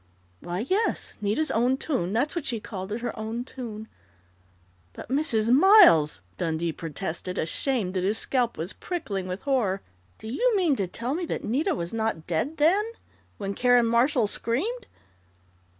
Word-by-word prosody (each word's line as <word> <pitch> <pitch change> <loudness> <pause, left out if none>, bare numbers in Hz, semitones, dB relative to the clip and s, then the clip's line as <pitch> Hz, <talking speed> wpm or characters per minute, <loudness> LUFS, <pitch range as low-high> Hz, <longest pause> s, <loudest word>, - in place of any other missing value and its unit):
"Why, 175 +2 -4
yes 415 +7 -1
Nita's 215 +10 0
own 245 +3 +2
tune. 255 - -1
That's 250 - 0
what 340 - -3
she 235 -3 -1
called 195 -2 -7
it 225 +2 -3
her 245 - -3
own 225 +2 -3
tune 225 -4 -8 0.5
" 90 -1 -35
"But, - - -10
Mrs. 245 -6 +1
Miles," 305 - +7 0.2
Dundee 165 0 -1
protested, 170 +3 -5
ashamed 195 - 0
that 185 -1 -1
his 205 +4 +1
scalp 245 -3 0
was 170 +5 -4
prickling 200 - -4
with 185 +2 -5
horror, 220 -9 0 0.3
"do - - -10
you 460 - +1
mean 340 -7 +3
to 195 - -1
tell 235 +8 -3
me 345 +3 -2
that - - -4
Nita 260 +8 0
was 170 +2 -4
not 220 -8 -2
dead 180 - -1
then 340 +8 +4 0.5
when 200 -1 -3
Karen 245 +1 +4
Marshall 235 +2 +3
screamed?" 375 - -2
225 Hz, 165 wpm, -26 LUFS, 185-275 Hz, 0.5 s, Miles